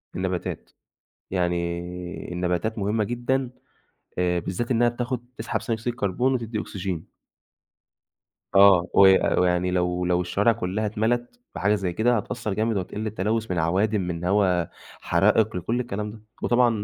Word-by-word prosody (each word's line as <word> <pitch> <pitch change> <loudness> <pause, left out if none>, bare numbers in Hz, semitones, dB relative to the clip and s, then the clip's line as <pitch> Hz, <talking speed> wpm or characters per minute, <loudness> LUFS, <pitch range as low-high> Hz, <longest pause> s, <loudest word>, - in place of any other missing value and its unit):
النباتات، 95 -1 -3 0.6
يعني، 90 0 -3
النباتات 90 +5 -1
مهمة 105 +2 0
جدًا، 120 +3 -1 0.7
آآ، 90 -1 +2
بالذات 105 +9 -3
إنها 120 0 +4
بتاخد 120 0 -3
تسحب 110 +1 -2
ثاني 115 - -1
أكسيد 120 +1 -2
الكربون، 120 +4 0
وتدي 115 -3 -3
أكسجين. 95 -6 -5 1.5
آه 95 -2 +7
وي 95 -1 +7 0.2
ويعني 90 0 +2
لو 90 0 0
لو 90 0 +2
الشوارع 100 +5 +2
كلها 105 -1 -2
اتملت 120 - -1 0.2
بحاجة 105 +2 +2
زي 95 -4 -2
كده، 120 +5 +2
هتأثر 110 -1 -3
جامد، 110 +1 0
وهتقل 105 +4 -4
التلوث 110 +1 -1
من 90 - 0
عوادم، 100 +6 +1
من 90 -1 -4
هوا 90 -3 +2 0.4
حرائق، 110 -3 +3
لكل 110 +8 -1
الكلام 105 -3 -3
ده. 110 -1 -13 0.2
وطبعًا 120 0 +4
100 Hz, 140 wpm, -25 LUFS, 90-115 Hz, 1.5 s, آه